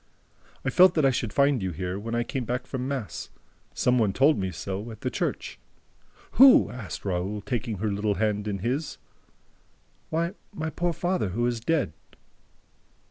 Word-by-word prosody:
"I 135 Hz, -, +1 dB
felt 180 Hz, +5 st, +6 dB
that 155 Hz, -3 st, +3 dB
I 135 Hz, -, +5 dB
should 120 Hz, -4 st, -2 dB
find 140 Hz, -2 st, +3 dB
you 95 Hz, -, -1 dB
here, 90 Hz, +3 st, -4 dB
when 115 Hz, +3 st, -4 dB
I 120 Hz, -, +1 dB
came 130 Hz, +1 st, -3 dB
back 125 Hz, +2 st, -3 dB
from 130 Hz, -1 st, -4 dB
mass. 120 Hz, -11 st, -4 dB, 0.5 s
Some 125 Hz, 0 st, +2 dB
one 105 Hz, -4 st, +2 dB
told 140 Hz, +8 st, +4 dB
me 95 Hz, -1 st, -1 dB
so, 100 Hz, +4 st, -5 dB
at 110 Hz, -, -10 dB
the -, -, -2 dB
church." -, -, -3 dB, 0.8 s
"Who?" 260 Hz, -, +8 dB
asked 115 Hz, -5 st, -7 dB
Raoul, 95 Hz, +2 st, -2 dB
taking 120 Hz, -1 st, -3 dB
her 105 Hz, +2 st, -1 dB
little 100 Hz, 0 st, 0 dB
hand 105 Hz, +1 st, 0 dB
in 100 Hz, -1 st, -1 dB
his. 140 Hz, +6 st, -2 dB, 1.1 s
"Why, 170 Hz, +3 st, -1 dB, 0.2 s
my 160 Hz, -6 st, -4 dB
poor 175 Hz, +1 st, -1 dB
father, 175 Hz, -, -1 dB
who 115 Hz, +6 st, -1 dB
is 120 Hz, -1 st, 0 dB
dead." 140 Hz, -, 0 dB
120 Hz, 175 wpm, -26 LUFS, 100-140 Hz, 1.1 s, Who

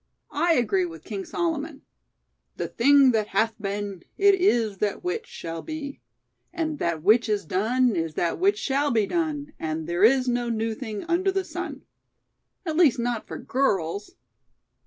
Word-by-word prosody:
I 335 Hz, +3 st, +3 dB
agree 210 Hz, -, +2 dB
with 165 Hz, -2 st, -11 dB
King 200 Hz, -3 st, -5 dB
Solomon: 320 Hz, -4 st, -3 dB, 0.7 s
'The -, -, -3 dB
thing 275 Hz, +2 st, +5 dB
that 215 Hz, -3 st, 0 dB
hath 225 Hz, +1 st, +1 dB
been, 200 Hz, -2 st, -4 dB, 0.2 s
it 400 Hz, 0 st, +6 dB
is 240 Hz, -, +2 dB
that 210 Hz, -, -1 dB
which, 425 Hz, +6 st, -3 dB
shall 165 Hz, -1 st, -6 dB
be; 300 Hz, -3 st, -6 dB, 0.5 s
and 315 Hz, -4 st, -3 dB
that 165 Hz, -2 st, -1 dB
which 220 Hz, +4 st, +4 dB
is 205 Hz, -3 st, 0 dB
done 225 Hz, +7 st, +1 dB
is 165 Hz, -2 st, -2 dB
that 170 Hz, -, -1 dB
which 400 Hz, +3 st, +3 dB
shall 285 Hz, -3 st, 0 dB
be 225 Hz, -5 st, +2 dB
done; 300 Hz, -, -2 dB
and 160 Hz, 0 st, -3 dB
there 175 Hz, +3 st, -1 dB
is 255 Hz, +3 st, +5 dB
no 240 Hz, -1 st, 0 dB
new 225 Hz, 0 st, -1 dB
thing 215 Hz, -3 st, -6 dB
under 355 Hz, +3 st, +1 dB
the 385 Hz, 0 st, -1 dB
sun.' -, -, -6 dB, 0.8 s
At 320 Hz, -2 st, -2 dB
least 315 Hz, -9 st, +5 dB
not 240 Hz, -1 st, -2 dB
for -, -, -6 dB
girls!" 200 Hz, -7 st, -1 dB
240 Hz, 165 wpm, -25 LUFS, 200-310 Hz, 0.8 s, it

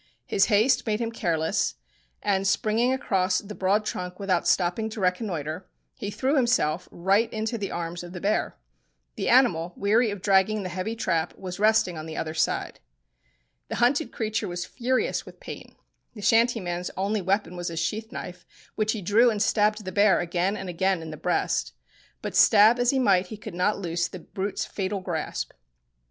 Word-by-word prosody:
His 195 Hz, -, +3 dB
haste 225 Hz, +4 st, +3 dB
made 210 Hz, 0 st, 0 dB
him 230 Hz, -1 st, -2 dB
careless, 165 Hz, -7 st, 0 dB, 0.5 s
and 195 Hz, -1 st, +1 dB
springing 225 Hz, +5 st, +2 dB
across 190 Hz, -7 st, +1 dB
the 210 Hz, +2 st, -5 dB
broad 205 Hz, +2 st, +1 dB
trunk 180 Hz, -2 st, -5 dB
without 190 Hz, -3 st, 0 dB
stopping 185 Hz, +5 st, +1 dB
to 220 Hz, -, -7 dB
reconnoitre, 180 Hz, -3 st, -2 dB, 0.3 s
he 210 Hz, -6 st, -5 dB
threw 265 Hz, +7 st, 0 dB
himself 210 Hz, -, +1 dB
right 195 Hz, +6 st, +1 dB
into 220 Hz, +2 st, -2 dB
the 205 Hz, -3 st, -3 dB
arms 170 Hz, 0 st, -4 dB
of 175 Hz, 0 st, -9 dB
the 180 Hz, -, -7 dB
bear. 205 Hz, +4 st, 0 dB, 0.6 s
The -, -, -2 dB
animal, 180 Hz, -10 st, +4 dB
weary 220 Hz, +4 st, +3 dB
of 205 Hz, -1 st, -4 dB
dragging 200 Hz, +1 st, +3 dB
the 185 Hz, -, -4 dB
heavy 185 Hz, +5 st, -3 dB
trap, 170 Hz, -7 st, -1 dB
was 185 Hz, 0 st, -7 dB
resting 215 Hz, -5 st, +3 dB
on 155 Hz, -, -7 dB
the 160 Hz, -, -7 dB
other 155 Hz, -1 st, -3 dB
side. 160 Hz, -, -1 dB, 0.9 s
The -, -, -4 dB
hunted 275 Hz, +6 st, +2 dB
creature 215 Hz, -1 st, -2 dB
was 175 Hz, 0 st, -4 dB
furious 255 Hz, +4 st, -1 dB
with -, -, -13 dB
pain. -, -, -9 dB, 0.4 s
The 210 Hz, -, -9 dB
shanty 230 Hz, +3 st, +4 dB
man's 175 Hz, -1 st, -3 dB
only 200 Hz, +2 st, 0 dB
weapon 190 Hz, 0 st, 0 dB
was 175 Hz, 0 st, -4 dB
his 165 Hz, -1 st, -3 dB
sheath 215 Hz, +7 st, -3 dB
knife, 180 Hz, -8 st, -7 dB, 0.3 s
which 215 Hz, 0 st, 0 dB
he 215 Hz, -4 st, -5 dB
drew 225 Hz, +7 st, +5 dB
and 215 Hz, -2 st, -1 dB
stabbed 210 Hz, 0 st, +2 dB
the 185 Hz, -, -4 dB
bear 205 Hz, +1 st, +4 dB
again 175 Hz, +4 st, -1 dB
and 190 Hz, -, -6 dB
again 180 Hz, 0 st, 0 dB
in 160 Hz, -, -7 dB
the -, -, -6 dB
breast. -, -, -1 dB, 0.5 s
But -, -, -4 dB
stab 220 Hz, +3 st, +6 dB
as 245 Hz, 0 st, +2 dB
he 270 Hz, -, +2 dB
might 195 Hz, -7 st, +3 dB
he 215 Hz, -, -8 dB
could 205 Hz, -, -9 dB
not 180 Hz, +4 st, +1 dB
loose 170 Hz, -3 st, -1 dB
the 180 Hz, -, -9 dB
brute's 195 Hz, +3 st, -4 dB
fatal 195 Hz, 0 st, -3 dB
grasp. 160 Hz, -, -3 dB
195 Hz, 185 wpm, -26 LUFS, 175-220 Hz, 0.9 s, stab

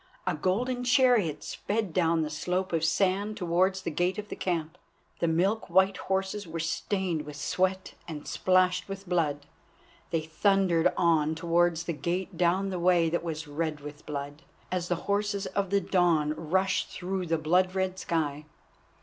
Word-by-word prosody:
A -, -, +1 dB
golden 240 Hz, +11 st, -1 dB
chariot 245 Hz, -, +3 dB
sped 205 Hz, -4 st, -3 dB
down 165 Hz, -2 st, +2 dB
the 150 Hz, -, -4 dB
slope 180 Hz, +4 st, -2 dB
of 165 Hz, -1 st, +1 dB
sand 195 Hz, +5 st, +1 dB
towards 185 Hz, +1 st, +1 dB
the -, -, -2 dB
gate 180 Hz, +5 st, 0 dB
of 210 Hz, 0 st, -6 dB
the -, -, -5 dB
camp. 170 Hz, -1 st, -3 dB, 0.4 s
The 170 Hz, -, +1 dB
milk 185 Hz, +7 st, +1 dB
white 190 Hz, +2 st, +4 dB
horses 190 Hz, +1 st, -2 dB
were 165 Hz, +1 st, -5 dB
stained 170 Hz, +1 st, -1 dB
with 150 Hz, -1 st, -9 dB
sweat 185 Hz, +6 st, -1 dB
and 155 Hz, -3 st, -7 dB
splashed 185 Hz, 0 st, +2 dB
with 195 Hz, 0 st, -7 dB
blood. 150 Hz, -5 st, 0 dB, 0.6 s
They 165 Hz, -2 st, 0 dB
thundered 180 Hz, +1 st, +2 dB
on 160 Hz, -3 st, +3 dB
towards 170 Hz, 0 st, +1 dB
the 170 Hz, -, -3 dB
gate 175 Hz, +4 st, -3 dB
down 180 Hz, +3 st, +2 dB
the 180 Hz, -, -3 dB
way 170 Hz, -1 st, +4 dB
that 170 Hz, -, 0 dB
was 160 Hz, -2 st, -4 dB
red 150 Hz, 0 st, -3 dB
with 150 Hz, +1 st, -9 dB
blood, 145 Hz, 0 st, -5 dB, 0.3 s
as 180 Hz, -1 st, -1 dB
the 175 Hz, -, +1 dB
horses 205 Hz, 0 st, 0 dB
of 195 Hz, -2 st, -2 dB
the 200 Hz, +1 st, +2 dB
dawn 170 Hz, -5 st, +2 dB
rush 185 Hz, +5 st, 0 dB
through 185 Hz, 0 st, -4 dB
the 165 Hz, 0 st, +1 dB
blood 180 Hz, +4 st, +2 dB
red 190 Hz, 0 st, -1 dB
sky. 150 Hz, -4 st, -2 dB
175 Hz, 165 wpm, -28 LUFS, 160-190 Hz, 0.6 s, white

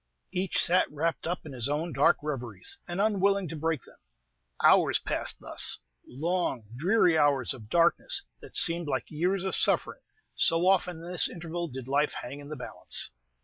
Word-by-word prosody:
Each 185 Hz, 0 st, -2 dB
sat 180 Hz, +2 st, +2 dB
wrapped 160 Hz, +3 st, -2 dB
up 175 Hz, 0 st, -4 dB
in 150 Hz, -, -8 dB
his 130 Hz, 0 st, -2 dB
own 155 Hz, +3 st, -2 dB
dark 135 Hz, +2 st, +3 dB
reveries, 120 Hz, -10 st, -4 dB
and 175 Hz, +1 st, -4 dB
unwilling 200 Hz, -2 st, +1 dB
to 165 Hz, -, -6 dB
break 160 Hz, -2 st, -2 dB
them. -, -, -17 dB, 0.6 s
Hours -, -, +5 dB
passed -, -, 0 dB
thus, -, -, -1 dB, 0.3 s
long, 160 Hz, -3 st, -2 dB
dreary 175 Hz, -, +3 dB
hours 140 Hz, -4 st, +2 dB
of 110 Hz, -4 st, -12 dB
darkness, 170 Hz, -, +2 dB, 0.2 s
that -, -, -8 dB
seemed 170 Hz, -1 st, +5 dB
like -, -, -3 dB
years 180 Hz, +5 st, -1 dB
of 190 Hz, -, -2 dB
suffering, -, -, 0 dB, 0.3 s
so 165 Hz, +1 st, +2 dB
often 180 Hz, -3 st, +1 dB
in 175 Hz, -, -7 dB
this 175 Hz, -3 st, +6 dB
interval 170 Hz, 0 st, -5 dB
did 130 Hz, -3 st, -8 dB
life 145 Hz, +2 st, +1 dB
hang 140 Hz, +4 st, -7 dB
in 145 Hz, 0 st, -11 dB
the 155 Hz, -, -6 dB
balance. 125 Hz, -, -1 dB
165 Hz, 175 wpm, -28 LUFS, 145-180 Hz, 0.6 s, this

